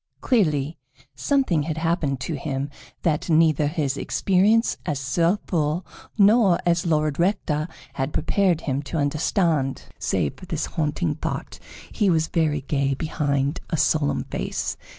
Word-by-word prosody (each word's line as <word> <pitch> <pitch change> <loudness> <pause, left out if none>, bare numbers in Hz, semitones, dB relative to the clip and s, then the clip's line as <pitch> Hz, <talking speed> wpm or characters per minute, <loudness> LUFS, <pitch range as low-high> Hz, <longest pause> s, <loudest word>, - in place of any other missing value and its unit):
Clearly, 155 - +1 0.3
something 265 - +1
had 155 +1 -3
happened 160 -5 0
to 165 - -3
him 140 -1 -3 0.3
that 155 0 0
neither 155 -2 +4
his 145 -3 -1
experience 205 +9 +2
as 145 -3 -2
Sir 165 +8 +1
Fool 160 +1 0 0.3
nor 205 -3 +5
as 170 0 +2
Lord 155 -2 +1
Rector 170 -4 0 0.3
had 135 +1 -2
prepared 180 0 +1
him 135 -2 -1
to 150 +3 -5
understand. 150 - 0 0.2
Save 70 - -1
for 185 - -12
this 160 -2 -2
haunting 150 -2 -1
thought, - - -5 0.3
he 210 -4 +1
was 160 -2 +2
very 155 -4 +1
gay 140 0 0
behind 140 -1 -1
a 165 - -1
solemn 145 0 +1
face. - - -3
155 Hz, 140 wpm, -24 LUFS, 145-175 Hz, 0.3 s, nor